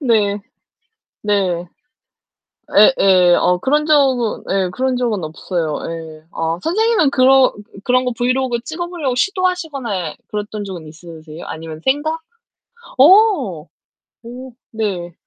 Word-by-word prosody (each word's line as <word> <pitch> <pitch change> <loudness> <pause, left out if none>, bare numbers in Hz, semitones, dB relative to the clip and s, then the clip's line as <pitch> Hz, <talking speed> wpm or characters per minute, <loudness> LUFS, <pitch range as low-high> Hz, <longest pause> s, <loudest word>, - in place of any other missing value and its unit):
네. 210 -6 +1 0.8
네. 190 -4 0 1.3
예예. 180 -2 +5
어 180 - +2
그런 295 +3 +1
적은 265 -7 +2
예. 190 -1 0
그런 255 +5 -1
적은 235 -5 -1
없어요. 160 0 -3
예. 160 -1 -9
아 165 +1 -2
선생님은 420 -3 +2
그러 265 0 +5
으 - - -10
그 205 -2 -16
그런 255 +2 +2
거 250 - 0
브이로그 255 0 0
찍어 345 +4 -5
보려고 310 -8 -3
시도하시거나 280 - -2
그랬던 210 0 -5
적은 180 -5 -8
있으세요? 160 0 -11
아니면 160 0 -8
생각? 310 +4 0 0.8
어. 280 - +4 0.6
오. 250 +2 -10 0.2
네. 195 -6 -3
230 Hz, 245 characters per minute, -18 LUFS, 180-270 Hz, 1.3 s, 예예